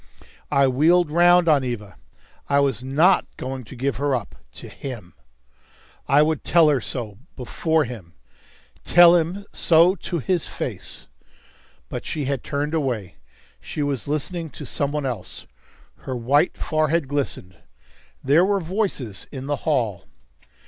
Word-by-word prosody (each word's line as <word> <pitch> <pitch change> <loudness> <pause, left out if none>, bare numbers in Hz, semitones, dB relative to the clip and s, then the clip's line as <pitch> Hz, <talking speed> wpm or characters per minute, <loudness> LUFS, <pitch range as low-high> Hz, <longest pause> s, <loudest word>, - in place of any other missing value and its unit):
I 140 -1 +3
wheeled 155 +5 +3
round 175 +1 +5
on 145 -4 +4
Eva. 105 -7 -5 0.5
I 140 - +3
was 135 -4 0
not 160 +8 +3
going 130 0 -5
to 110 - -11
give 130 -1 -2
her 140 0 0
up 115 -5 -5 0.2
to - - -10
him. 115 - -8 0.9
I 145 +2 +5
would 155 -2 -1
tell 165 -3 +4
her 140 -4 +2
so 110 -6 -6 0.2
before 160 +5 0
him 110 -10 -9 0.7
tell 175 0 +7
him 175 +4 -1
so 170 +2 +4
to 175 -1 -5
his 170 +3 -1
face. - - -6 0.8
But - - -6
she 150 -3 -3
had 135 -2 -2
turned 145 +2 -3
away; 125 - -2 0.4
she 150 - -4
was 140 -4 -2
listening 160 +3 -3
to - - -9
some 140 -1 -2
one 150 -1 -2
else. 120 -8 -5 0.5
Her 130 - -6
white 135 +8 +1
forehead 155 -1 0
glistened. 135 -10 -3 0.7
There 145 +6 +4
were 200 +1 +2
voices 165 - -3
in 135 -2 -7
the 145 +1 -1
hall. 115 - 0
145 Hz, 145 wpm, -22 LUFS, 130-165 Hz, 0.9 s, tell